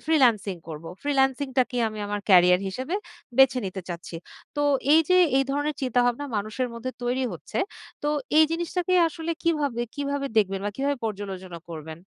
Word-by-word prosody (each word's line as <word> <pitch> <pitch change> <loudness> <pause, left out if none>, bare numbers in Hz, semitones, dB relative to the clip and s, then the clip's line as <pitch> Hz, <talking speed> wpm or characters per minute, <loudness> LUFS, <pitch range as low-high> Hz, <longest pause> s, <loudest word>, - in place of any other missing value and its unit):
Freelancing 230 - +3
করব। 155 0 -7 0.2
ফ্রিল্যান্সিংটাকেই 265 -3 +1
আমি 215 0 -8
আমার 205 0 -2
কেরিয়ার 180 -1 +6
হিসেবে 260 - -4 0.4
বেছে 265 -1 +6
নিতে 190 +1 -5
চাচ্ছি। 170 -1 -6 0.4
তো 290 - +1 0.3
এই 320 - +8
যে, 365 - +5 0.2
এই 270 - +4
ধরনের 290 +2 -1
চিন্তাভাবনা 245 +1 +1
মানুষের 215 +5 -2
মধ্যে 235 +2 -4
তৈরি 250 +2 0
হচ্ছে। 170 - -6 0.4
তো 295 - 0 0.3
এই 315 - +8
জিনিসটাকে 345 +2 -1
আসলে 330 0 -5
কিভাবে, 290 -8 0
কিভাবে 285 -1 -2
দেখবেন? 195 -2 +2
বা 205 - 0
কিভাবে 280 +1 0
পর্যালোচনা 190 -4 -5
করবেন? 160 -1 -7
250 Hz, 155 wpm, -25 LUFS, 195-285 Hz, 0.4 s, এই